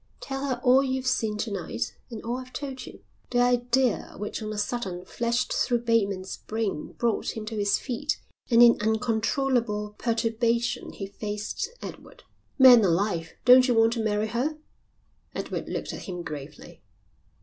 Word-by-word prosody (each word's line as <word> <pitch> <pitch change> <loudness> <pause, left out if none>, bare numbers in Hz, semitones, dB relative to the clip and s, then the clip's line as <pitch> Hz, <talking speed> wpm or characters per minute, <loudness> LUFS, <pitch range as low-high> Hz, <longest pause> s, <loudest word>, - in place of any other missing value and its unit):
Tell 270 +1 -4
her 255 -3 -1
all 255 +1 +6
you've 260 -1 -2
seen 220 -4 0
to 215 +1 -3
night 115 - -4
and 230 -3 -7
all 235 +2 -2
I've 255 0 -10
told 265 -3 -6
you." - - -12 0.3
The 245 - +1
idea 245 0 +2
which 210 +3 -4
on 215 0 -4
a 215 - -5
sudden 200 -5 -3
flashed 235 +4 -1
through 240 -1 +1
Bateman's 200 -5 0
brain 215 -8 -3
brought 230 -1 -1
him 215 - -5
to 220 +1 -5
his 205 -1 +2
feet 285 +3 -3 0.3
and 235 -1 +7
in 235 -3 +6
uncontrollable 220 -1 0
perturbation 235 +1 0
he 195 - -5
faced 210 - -4
Edward. - - -10 0.3
"Man 255 -4 +9
alive, 170 -2 0
don't 255 +1 +8
you 245 - +2
want 225 0 +4
to 230 -2 -2
marry 215 0 0
her?" 265 +7 -1 0.8
Edward - - -4
looked - - -4
at - - -7
him 180 -1 -5
gravely. 145 -2 -9
230 Hz, 160 wpm, -26 LUFS, 210-250 Hz, 0.8 s, Man